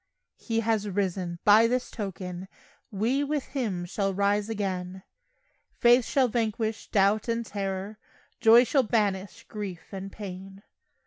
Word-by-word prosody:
He 225 -1 -1
has 215 -2 0
risen! 185 -3 -2
By 215 +2 +6
this 250 +1 -1
token 185 -3 -6 0.4
We 230 +8 0
with 290 -1 -2
Him 210 -10 -2
shall 195 +2 -2
rise 205 +2 +1
again; 190 -3 -3 0.7
Faith 240 0 +5
shall 265 -2 +2
vanquish 220 -1 -2
doubt 205 +2 +2
and 230 0 -1
terror, 195 0 -4 0.4
Joy 235 +1 +7
shall 270 +2 +2
banish 205 -4 -1
grief 200 -4 -7
and 195 0 -6
pain. 195 -1 -9
205 Hz, 130 wpm, -27 LUFS, 190-230 Hz, 0.7 s, Joy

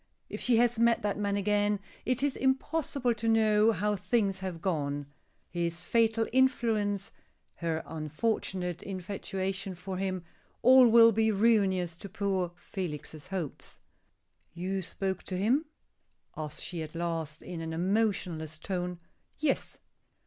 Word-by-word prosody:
If - - -6
she 245 -2 +3
has 240 0 +3
met 235 -1 +4
that 205 0 -1
man 200 -1 0
again, 205 0 +1 0.3
it 255 +1 +1
is 285 -2 +1
impossible 265 -1 0
to 225 0 -4
know 220 -1 +4
how 210 +1 0
things 195 0 0
have 185 -3 -5
gone. 145 -5 -1 0.4
His 170 0 -2
fatal 225 +1 +2
influence 225 -6 +2 0.5
her 165 -1 -2
unfortunate 175 +2 -2
infatuation 195 0 -4
for 185 +1 -5
him 185 -2 -2 0.4
all 255 0 +8
will 230 0 +8
be 220 +1 +2
ruinous 195 -5 +2
to 200 - -8
poor 190 -2 -1
Felix's 160 -3 -6
hopes. 180 -6 -5 0.8
"You 190 +2 -2
spoke 190 +1 -3
to 185 - -3
him?" 245 - +2 0.7
asks 150 -1 -5
she 170 -3 -4
at 155 +1 -7
last, 165 -3 -3
in 170 -2 -6
an 160 0 -4
emotionless 175 -4 0
tone. 180 +1 -3 0.4
"Yes." 290 -2 -1
195 Hz, 135 wpm, -30 LUFS, 175-225 Hz, 0.8 s, all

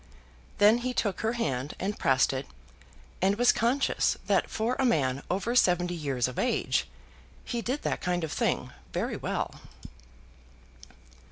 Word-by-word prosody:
Then 210 +3 +6
he 250 +1 -3
took 200 -4 -1
her 225 +1 0
hand 140 - -2
and 200 +2 -3
pressed 135 0 +3
it, 135 +1 -4 0.7
and 195 +2 +3
was 245 +3 +5
conscious 250 +5 +1
that - - +2
for 230 +3 -1
a - - +3
man 140 - +1
over 200 +6 -1
seventy 175 -5 +3
years 140 -7 -1
of 125 - -5
age - - +1 0.6
he 235 - -2
did 260 +5 -3
that - - -1
kind 180 -1 -1
of 160 - -3
thing - - -1 0.2
very - - -1
well. - - -3
190 Hz, 150 wpm, -28 LUFS, 145-235 Hz, 0.7 s, Then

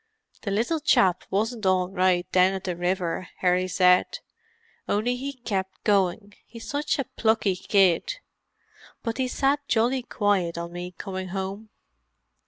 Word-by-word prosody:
"The 205 - -4
little 235 +11 0
chap 185 - +3
wasn't 220 +1 -1
all 185 -1 +3
right 185 -2 +2
down 185 +1 +4
at 190 - -5
the 180 -2 -3
river," 180 0 -2
Harry 180 0 +2
said. 180 0 +3 0.7
"Only 225 +5 +1
he 275 +3 -5
kept 195 -7 -4
going; 200 0 +1
he's 230 -1 -10
such 295 +1 -1
a 275 - 0
plucky 220 -5 +1
kid. 195 - +2 0.9
But 230 +1 -3
he 260 - +1
sat 280 +2 0
jolly 240 +3 +2
quiet 200 -7 0
on 170 0 -5
me 180 0 -7
coming 190 -2 -5
home." 195 +3 -5
195 Hz, 145 wpm, -25 LUFS, 185-230 Hz, 0.9 s, down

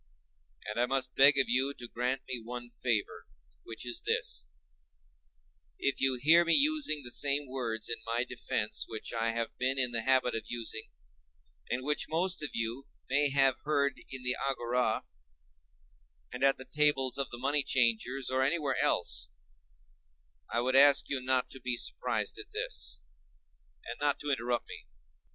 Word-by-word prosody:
And 105 +2 -4
I 120 - +3
must 130 -1 -1
beg 140 +1 +6
of 140 - +3
you 135 +3 +2
to 120 - -8
grant 125 +3 -2
me 130 -2 -2
one 120 +1 -6
favor, 115 -4 -2 0.3
which 115 +1 -9
is 120 -1 -4
this—if 65 - -6
you 135 -1 +3
hear 165 +6 +6
me 170 - +4
using 290 - +3
the 120 - -5
same 145 +2 +1
words 120 -4 -3
in 115 - -1
my 115 +2 0
defence 125 - -2
which 110 - -6
I 115 0 0
have 115 0 -3
been 130 +1 +1
in 125 -2 +2
the 115 -1 +1
habit 130 +1 +2
of 115 - -2
using, 115 -2 -3 0.8
and 125 +1 -2
which 150 +2 -1
most 175 +3 0
of 145 - -3
you 115 +4 -2 0.3
may 145 +1 +3
have 135 -2 +3
heard 140 -2 0
in 130 -1 -6
the 125 0 +3
agora, 125 -4 -1 1.3
and 125 - -4
at 135 0 +4
the 130 - -10
tables 145 -3 +1
of 135 - -1
the 120 - -7
money 140 +4 +1
changers, 125 +1 +1
or 130 0 +1
anywhere 140 0 0
else, - - 0 1.2
I 120 - +1
would 130 +2 0
ask 140 0 +6
you 140 -2 -1
not 130 0 +2
to 135 - -7
be 125 -1 -2
surprised - - -2
at - - -8
this, - - -3 0.9
and 120 - -7
not 145 -1 +1
to 145 - -2
interrupt 120 -2 -1
me. - - -10
130 Hz, 165 wpm, -31 LUFS, 115-140 Hz, 1.3 s, beg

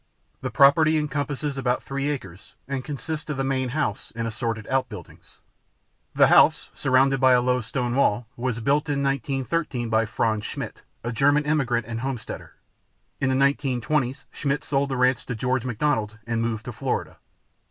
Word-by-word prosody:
The - - -2
property 155 +3 +5
encompasses 145 -1 -2
about 125 -1 0
three 140 +1 -2
acres 95 -10 -7
and 135 -1 -3
consists 155 +3 -5
of 150 - -2
the 135 - 0
main 130 -1 0
house 125 -6 -2
and 115 0 -2
assorted 115 -2 -3
outbuildings. 125 -9 -4 0.8
The - - +7
house, - - +5
surrounded 135 +1 +3
by 130 0 +6
a 125 - +6
low 125 0 +1
stone 120 +2 -2
wall, 120 -3 +2
was 120 -2 -2
built 145 +5 +1
in 140 -1 0
1913 135 -1 -1
by 110 0 +2
Franz 110 -1 0
Schmidt, - - -6 0.2
a 120 - -2
German 145 +4 +3
immigrant 135 -6 +1
and 115 +1 -4
homesteader. 130 -2 -5 0.6
In 135 - +1
the 130 - +2
1920s 135 0 0
Schmidt 140 -1 -2
sold 140 0 0
the 135 - -2
ranch 125 0 +2
to 125 - -3
George 125 +2 -1
McDonald 115 -3 -1
and 115 -1 -1
moved 115 -1 -2
to 120 - -5
Florida. - - -3
130 Hz, 165 wpm, -24 LUFS, 120-140 Hz, 0.8 s, The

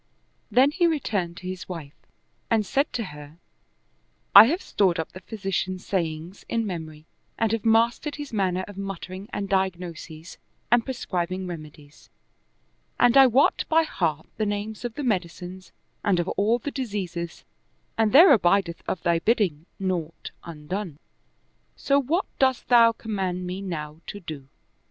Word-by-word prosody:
Then 265 +3 +4
he 345 +2 +2
returned 200 - -1
to 180 - -8
his 185 0 -6
wife 160 -5 -7 0.6
and 220 -2 +2
said 280 +7 0
to 235 - -1
her, 150 +1 -12 1.0
"I 200 +2 +12
have 330 +10 -1
stored 185 -4 +1
up 160 - -3
the 185 - -10
physician's 190 -2 -3
sayings 170 0 -3
in 230 -1 0
memory 160 -5 -6 0.3
and 225 -2 +1
have 225 -2 -1
mastered 230 +6 +2
his 290 -4 -8
manner 185 -3 0
of 205 -1 -9
muttering 195 +1 -6
and 200 -1 -3
diagnoses 175 -4 -3 0.3
and 240 -1 +5
prescribing 185 -7 -3
reme 160 -4 -7
dies, 145 0 -19 0.9
and 245 +1 +5
I 270 -1 +9
wot 255 +4 +3
by 325 +1 +4
heart 160 - -2
the 215 - 0
names 205 +2 -4
of 240 -2 -4
the 295 - -4
medicines 185 -4 -3 0.3
and 200 -4 +2
of 175 - -1
all 215 +4 +2
the 285 +4 -5
diseases, 190 -10 -4 0.5
and 220 -1 +2
there 315 +4 +9
abideth 180 -5 +2
of 175 - -3
thy 170 -1 +2
bidding 180 -7 0
naught 175 -4 -3
undone: 170 +1 -6 0.8
so 280 0 +2
what 325 +9 0
dost 260 -2 +1
thou 235 -2 +7
command 190 -5 -3
me 180 +2 -4
now 155 -4 -6
to 205 - -6
do?" 155 -7 -8
190 Hz, 155 wpm, -25 LUFS, 170-230 Hz, 1.0 s, I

